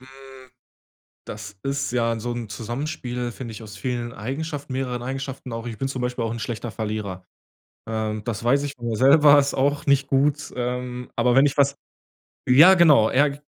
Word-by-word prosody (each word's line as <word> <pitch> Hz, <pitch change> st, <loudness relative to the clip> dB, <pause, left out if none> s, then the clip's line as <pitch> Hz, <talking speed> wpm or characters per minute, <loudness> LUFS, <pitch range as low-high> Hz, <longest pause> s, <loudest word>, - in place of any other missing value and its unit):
Hm, 130 Hz, 0 st, -15 dB, 0.8 s
das 105 Hz, -1 st, -8 dB
ist 140 Hz, -2 st, -2 dB
ja 115 Hz, -2 st, 0 dB
so 120 Hz, +2 st, -3 dB
'n 120 Hz, -2 st, -5 dB
Zusammenspiel, 120 Hz, +2 st, -4 dB
finde 120 Hz, -1 st, -8 dB
ich, 110 Hz, -, -9 dB
aus 105 Hz, -1 st, -10 dB
vielen 120 Hz, +2 st, -3 dB
Eigenschaften 140 Hz, +4 st, -5 dB
mehreren 125 Hz, -2 st, -3 dB
Eigenschaften 135 Hz, 0 st, -5 dB
auch. 115 Hz, +1 st, -5 dB
Ich 115 Hz, -3 st, -6 dB
bin 135 Hz, -, -2 dB
zum 130 Hz, -2 st, -4 dB
Beispiel 125 Hz, -1 st, -2 dB
auch 115 Hz, -, -2 dB
'n 115 Hz, -, -5 dB
schlechter 115 Hz, 0 st, -4 dB
Verlierer. 105 Hz, -4 st, -5 dB, 0.6 s
Ähm, 110 Hz, -1 st, -3 dB
das 115 Hz, -2 st, -4 dB
weiß 135 Hz, +4 st, +3 dB
ich 145 Hz, -1 st, -4 dB
von 120 Hz, -1 st, -7 dB
mir 115 Hz, -, -1 dB
selber, 145 Hz, +3 st, +6 dB
ist 140 Hz, -1 st, +2 dB
auch 145 Hz, +2 st, 0 dB
nicht 140 Hz, -1 st, +3 dB
gut, 140 Hz, +2 st, +1 dB
ähm, 125 Hz, 0 st, -4 dB
aber 120 Hz, +1 st, +2 dB
wenn 135 Hz, +2 st, +6 dB
ich 145 Hz, 0 st, 0 dB
was 140 Hz, 0 st, +3 dB, 0.7 s
ja, 155 Hz, +9 st, +8 dB
genau, 150 Hz, -11 st, +6 dB
eher 140 Hz, +2 st, +3 dB
k 140 Hz, -, -9 dB
125 Hz, 190 wpm, -23 LUFS, 115-140 Hz, 0.8 s, ja